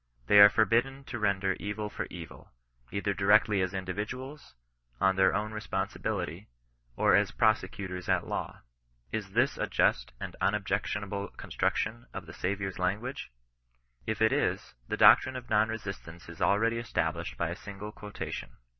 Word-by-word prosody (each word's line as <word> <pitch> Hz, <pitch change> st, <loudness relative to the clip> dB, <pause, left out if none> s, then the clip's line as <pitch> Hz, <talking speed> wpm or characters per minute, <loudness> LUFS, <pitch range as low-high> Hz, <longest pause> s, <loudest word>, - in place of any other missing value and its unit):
They 105 Hz, -, +6 dB
are 100 Hz, 0 st, +11 dB
forbidden 120 Hz, +6 st, +2 dB
to 125 Hz, -3 st, -6 dB
render 100 Hz, -2 st, +1 dB
evil 105 Hz, +1 st, -3 dB
for -, -, -5 dB
evil, 85 Hz, -3 st, -10 dB, 0.4 s
either 100 Hz, 0 st, -1 dB
directly 100 Hz, +1 st, +4 dB
as 95 Hz, 0 st, 0 dB
individuals, 105 Hz, -, -5 dB, 0.4 s
on 95 Hz, 0 st, +3 dB
their 95 Hz, 0 st, +4 dB
own 105 Hz, +2 st, -1 dB
responsibility, 100 Hz, -3 st, -3 dB, 0.5 s
or -, -, +4 dB
as -, -, +3 dB
prosecutors 95 Hz, -4 st, 0 dB
at -, -, +2 dB
law. -, -, -4 dB, 0.5 s
Is 105 Hz, -3 st, -4 dB
this 120 Hz, +5 st, +2 dB
a -, -, 0 dB
just -, -, +1 dB
and -, -, -6 dB
unobjectionable 100 Hz, 0 st, -1 dB
construction 115 Hz, +3 st, -2 dB
of 95 Hz, -, -5 dB
the 80 Hz, -, -11 dB
Saviour's 95 Hz, 0 st, -3 dB
lan 90 Hz, +3 st, +1 dB
guage? 130 Hz, -, -6 dB, 0.8 s
If 110 Hz, 0 st, 0 dB
it 110 Hz, -, +4 dB
is, -, -, -1 dB
the -, -, -2 dB
doctrine 130 Hz, -, +7 dB
of 125 Hz, -2 st, -8 dB
Non 110 Hz, +1 st, +4 dB
Resistance 100 Hz, -6 st, -7 dB
is 85 Hz, -, -10 dB
already 115 Hz, +3 st, +2 dB
established 115 Hz, -, -2 dB
by 85 Hz, -, -1 dB
a -, -, -4 dB
single 100 Hz, +2 st, -8 dB
quotation. 105 Hz, -, -7 dB
100 Hz, 155 wpm, -30 LUFS, 95-110 Hz, 0.8 s, are